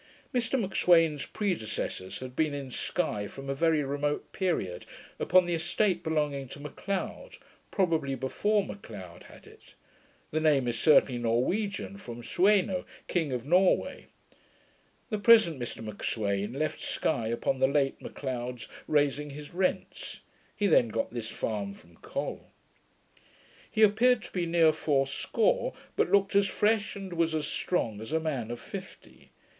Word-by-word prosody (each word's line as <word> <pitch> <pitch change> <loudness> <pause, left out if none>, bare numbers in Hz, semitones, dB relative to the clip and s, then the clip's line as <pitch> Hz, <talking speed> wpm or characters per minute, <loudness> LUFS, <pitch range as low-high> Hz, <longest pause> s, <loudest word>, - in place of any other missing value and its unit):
Mr 245 +1 +1
M'Sweyn's 165 -7 +3
predecessors 110 - -3
had 130 -1 -7
been 155 -1 +1
in 135 -2 -6
Sky 110 - -1
from 135 +5 -6
a - - +1
very 160 +1 +2
remote 145 +1 -2
period, 165 - -1 0.4
upon 185 0 +5
the 175 - -1
estate 175 +2 +1
belonging 150 -4 -1
to 140 - -10
M'Leod; 185 +7 -5 0.3
probably 160 -8 +1
before 205 - +1
M'Leod 100 - -9
had - - -15
it. - - -18 0.6
The 155 - +1
name 145 -5 +3
is 115 -2 -1
certainly 135 -5 +5
Norwegian, 190 - -1
from 120 -9 -8
Sueno, 190 - +2 0.2
King 165 -6 0
of 125 -1 -3
Norway. 180 +5 +2 1.0
The 215 - 0
present 210 - +6
Mr 120 -1 -5
M'Sweyn 105 0 -2
left 155 +1 -2
Sky 115 -8 -1
upon 120 +3 -1
the 130 - +5
late 140 -1 +1
M'Leod's 125 -3 -5 0.2
raising 145 0 +1
his 145 +2 -9
rents. 185 +1 -2 0.3
He 205 - 0
then 155 -10 +5
got 115 +1 -2
this 115 -2 -4
farm 100 -3 -3
from 85 -2 -20
Col. - - -5 1.2
He 220 - +2
appeared 230 +4 +4
to - - -11
be 175 -2 -1
near 165 -2 +4
fourscore; 155 - +1 0.2
but - - +2
looked 200 0 +3
as 200 0 +5
fresh, 210 0 +1
and 195 -2 -6
was 165 -1 +1
as 155 -1 -1
strong 115 - -1
as 110 - -7
a 160 - +2
man 140 -8 -2
of 120 0 -5
fifty. - - -10
150 Hz, 145 wpm, -29 LUFS, 125-185 Hz, 1.2 s, present